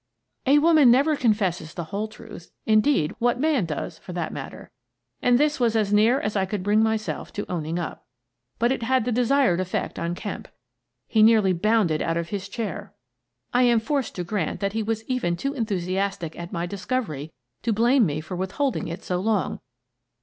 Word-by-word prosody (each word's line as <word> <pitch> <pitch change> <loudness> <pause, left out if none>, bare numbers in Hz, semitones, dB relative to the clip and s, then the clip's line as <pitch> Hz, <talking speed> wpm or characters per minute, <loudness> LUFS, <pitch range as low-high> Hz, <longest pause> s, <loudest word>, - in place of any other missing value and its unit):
A 280 +2 +6
woman 305 -3 +6
never 280 +6 +4
confesses 195 - 0
the 170 - -3
whole 200 +6 -3
truth 215 -4 -12
— - - -51
in 215 -1 +5
deed, 215 - +1
what 245 +1 +1
man 290 - +2
does, 160 +1 -5
for 180 - -9
that 170 -3 -3
matter? - - -8 0.3
— - - -51
and 245 -1 +4
this 295 +1 +1
was 235 -2 +2
as 210 -2 +1
near 225 +6 +4
as 210 -4 -3
I 190 -1 +1
could 195 -1 -3
bring 210 +2 +3
myself 220 -1 -1
to 205 - -4
owning 165 -1 -3
up. 175 - -5 0.5
But 235 +2 +2
it 265 - -1
had 255 0 +1
the 250 - 0
desired 250 -4 +3
effect 185 0 -3
on 170 +1 -2
Kemp. - - -6 0.6
He 220 - +2
nearly 215 -4 +5
bounded 180 -3 +2
out 165 0 0
of 170 0 -3
his 200 -1 -4
chair. 210 -5 -5 0.6
I 250 - +4
am 240 -2 +4
forced 275 +1 -2
to 180 - -3
grant 175 -3 -2
that 200 -1 -1
he 225 - -1
was 220 +1 -2
even 250 -10 0
too 275 +9 -2
enthusiastic 195 - -2
at 170 0 -7
my 170 -3 -2
discovery 190 - -3 0.3
to 230 - 0
blame 235 +4 +4
me 150 0 -2
for 160 +4 -7
withholding 195 +10 -1
it 170 - -6
so 180 -1 -1
long. 205 -3 0
215 Hz, 200 wpm, -24 LUFS, 180-245 Hz, 0.6 s, A